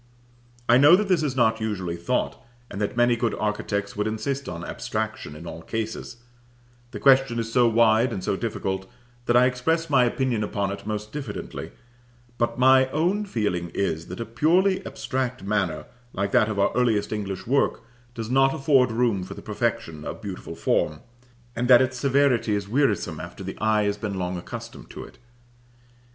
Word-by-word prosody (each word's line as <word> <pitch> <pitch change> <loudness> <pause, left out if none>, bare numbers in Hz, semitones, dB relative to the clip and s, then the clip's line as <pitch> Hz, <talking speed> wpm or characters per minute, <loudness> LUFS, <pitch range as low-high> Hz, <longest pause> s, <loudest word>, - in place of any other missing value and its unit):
I 120 +2 +6
know 145 +5 +8
that 205 +2 0
this 180 -4 +3
is 145 -4 -1
not 110 -3 +2
usually 95 -6 -2
thought, 85 0 -2 0.3
and 100 - -5
that 105 +3 -2
many 120 0 +4
good 115 -1 -1
architects 100 -1 -2
would 105 +1 -1
insist 130 +6 -3
on 85 -1 -6
abstraction 110 -8 -4
in 80 +3 -10
all 80 -1 -7
cases: 110 +5 -5 0.7
the 120 - -7
question 135 -3 +4
is 115 0 -3
so 120 -1 +5
wide 115 +1 +4
and 95 - -4
so - - 0
difficult 95 -3 -3 0.4
that 120 - +4
I 125 - +6
express 160 +6 0
my 130 -3 +5
opinion 120 -2 0
upon 100 -1 -2
it 100 +1 -7
most 105 0 -4
diffidently; 135 -8 -6 0.7
but 120 -1 0
my 130 +1 +5
own 180 +9 0
feeling 105 - -2
is, 80 -4 -1
that 90 - -7
a 115 - -3
purely 185 - +2
abstract 125 -5 -3
manner, 100 -6 -1 0.3
like 100 +1 -2
that 110 - +4
of 105 - -3
our 100 - +2
earliest 110 -4 +1
English 100 -3 -4
work, 130 -2 +1 0.3
does 115 -1 -4
not 135 +1 +4
afford 135 -3 +3
room 115 -4 +1
for 90 - -8
the - - -10
perfection 75 -2 -2
of - - -6
beautiful - - -7
form, 75 - 0 0.5
and 120 +1 -1
that 125 -1 +8
its 130 0 +1
severity 135 -5 +2
is 100 -1 -3
wearisome 120 -3 0
after - - -8
the - - -6
eye 110 -1 +2
has 100 0 0
been 105 -1 -4
long 90 0 -2
accustomed 85 - -8
to - - -8
it. - - -15
115 Hz, 180 wpm, -25 LUFS, 100-130 Hz, 0.7 s, know